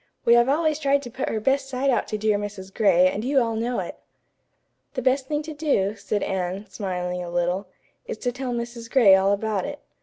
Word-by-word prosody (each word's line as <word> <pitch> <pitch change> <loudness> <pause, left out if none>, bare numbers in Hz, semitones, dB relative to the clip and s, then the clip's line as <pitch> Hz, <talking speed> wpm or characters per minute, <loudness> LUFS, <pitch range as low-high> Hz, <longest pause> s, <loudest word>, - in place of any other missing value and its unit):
"We 235 - +6
have 240 +2 +5
always 310 +1 +1
tried 280 -1 +2
to 240 - -8
put 260 +4 -3
her 220 - -1
best 270 +4 +1
side 270 +1 +1
out - - 0
to 215 - -3
dear 210 -1 +1
Mrs. 200 -2 -7
Gray, 185 -4 +4
and 200 +3 -2
you 270 +2 +3
all 230 -2 0
know 235 +2 -1
it." - - -8 1.0
"The 260 - -1
best 260 +1 +2
thing 295 +1 -1
to 315 0 -7
do," 275 -10 0
said 205 0 -2
Anne, 190 +1 -2
smiling 180 -3 -3
a 175 - -6
little, 175 +3 -1 0.4
"is - - -4
to 245 - -2
tell 255 0 -4
Mrs. 235 -1 -5
Gray 235 -7 +6
all 190 +1 +4
about 205 0 -1
it. 290 0 -6
230 Hz, 220 wpm, -24 LUFS, 195-265 Hz, 1.0 s, We